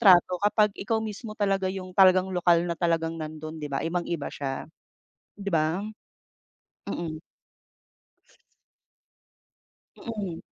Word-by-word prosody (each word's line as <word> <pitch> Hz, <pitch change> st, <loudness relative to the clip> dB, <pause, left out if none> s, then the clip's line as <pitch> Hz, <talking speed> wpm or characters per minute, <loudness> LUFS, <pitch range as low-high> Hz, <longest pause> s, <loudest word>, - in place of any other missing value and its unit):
trato 180 Hz, -3 st, +6 dB
kapag 210 Hz, 0 st, +3 dB
ikaw 220 Hz, +2 st, -1 dB
mismo 215 Hz, +1 st, -6 dB
talaga 195 Hz, -2 st, +1 dB
yung 185 Hz, -1 st, -5 dB
talagang 185 Hz, 0 st, +5 dB
lokal 175 Hz, -1 st, +4 dB
na 175 Hz, -, -1 dB
talagang 165 Hz, -1 st, 0 dB
nandun, 155 Hz, +1 st, -6 dB
di 150 Hz, -, -4 dB
ba? 140 Hz, -, -2 dB
Ibang-iba 170 Hz, -2 st, -2 dB
siya, 135 Hz, -2 st, -3 dB, 0.7 s
di 200 Hz, -1 st, -5 dB
ba? 160 Hz, +5 st, +1 dB, 1.0 s
Mm. 155 Hz, -2 st, -4 dB, 2.8 s
Mm. 205 Hz, -8 st, -5 dB
180 Hz, 110 wpm, -27 LUFS, 165-200 Hz, 2.8 s, trato